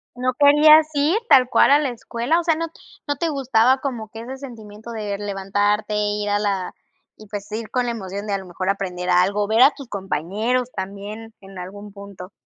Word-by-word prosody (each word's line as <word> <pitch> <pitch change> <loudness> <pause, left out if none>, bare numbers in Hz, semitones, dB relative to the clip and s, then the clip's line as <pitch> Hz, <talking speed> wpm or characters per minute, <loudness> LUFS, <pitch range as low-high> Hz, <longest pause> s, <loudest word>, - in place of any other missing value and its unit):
¿No 255 +1 -1
querías 300 +3 +6
ir 295 +8 +2
tal 255 -2 +6
cual - - +4
a 290 - +6
la 285 -3 -1
escuela? 240 +6 -1
O - - -3
sea, 325 -2 +2
no, 330 +1 -3 0.4
¿no 290 - 0
te 335 -1 -1
gustaba 260 -2 +2
como 235 -6 -4
que 225 +1 -9
ese 260 +3 -7
sentimiento 225 -4 -10
de 210 -3 -4
levantarte, 205 +1 -1
ir 210 0 -1
a 205 0 +1
la 195 -3 -2 0.5
y, 215 - -13
pues, 205 0 -7
ir 220 0 -5
con 250 -1 0
la 240 - -1
emoción 200 -1 -6
de 200 - -2
a - - +1
lo 190 - -9
mejor 185 +2 -4
aprender 180 -2 -3
algo, 195 +3 +2
ver 220 +3 +3
a 280 - +7
tus 275 -4 -11
compañeros 205 +7 -2
también 205 +3 -7
en 195 -1 -13
algún 200 +3 -9
punto? 200 -2 -11
215 Hz, 205 wpm, -21 LUFS, 200-255 Hz, 0.5 s, a